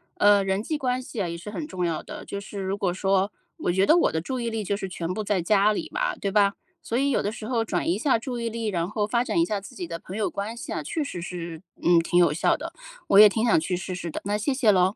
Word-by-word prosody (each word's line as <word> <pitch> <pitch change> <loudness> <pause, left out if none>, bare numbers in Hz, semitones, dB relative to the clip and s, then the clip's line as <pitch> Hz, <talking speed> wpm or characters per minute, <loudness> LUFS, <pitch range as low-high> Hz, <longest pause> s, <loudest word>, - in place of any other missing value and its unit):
呃， 205 -1 +5
人 195 +1 0
际 310 +6 -2
关 255 -2 -1
系 235 -4 -5
啊， 180 - -1
也 170 0 -4
是 190 +5 -8
很 300 +7 -5
重 180 - -2
要 165 -2 -1
的。 - - -9
就 200 - -5
是 200 0 -7
如 190 +1 -2
果 185 -3 0
说， 195 +1 +1 0.3
我 - - 0
觉 190 +2 +3
得 325 - +6
我 345 - +3
的 160 - -1
注 255 +8 -3
意 235 -1 -1
力 225 -1 -3
就 200 +1 -1
是 195 - -4
全 180 -1 -4
部 215 - -3
在 200 -3 0
家 205 +4 +4
里 - - -4
嘛， - - 0
对 200 - -3
吧。 200 -1 +4 0.3
所 235 - -2
以 280 +1 +2
有 - - +2
的 205 - -1
时 215 0 -7
候 230 -1 0
转 180 -5 -1
移 175 - +2
一 - - -2
下 260 +1 +2
注 245 +1 -5
意 235 -1 -2
力， 230 0 -3
然 175 -4 -1
后 210 0 0
发 235 +3 +1
展 320 - -2
一 335 - +4
下 210 -8 -2
自 195 - -12
己 180 - -4
的 165 0 -6
朋 185 - -9
友 215 -1 0
关 205 +3 -4
系 235 - -7
啊， - - -2
确 320 - -2
实 180 -12 -5
是， 170 -2 -6 0.2
嗯， 170 -1 +6
挺 170 +1 +1
有 175 -3 +5
效 155 - +2
的。 - - -6 0.4
我 200 - +6
也 210 - +11
挺 220 +3 0
想 220 -8 +4
去 180 +3 -2
试 180 +1 -4
试 175 -1 -4
的， - - -5
那 205 +1 0
谢 240 +6 0
谢 250 -5 +4
咯。 185 +1 +3
200 Hz, 330 characters per minute, -25 LUFS, 180-225 Hz, 0.4 s, 也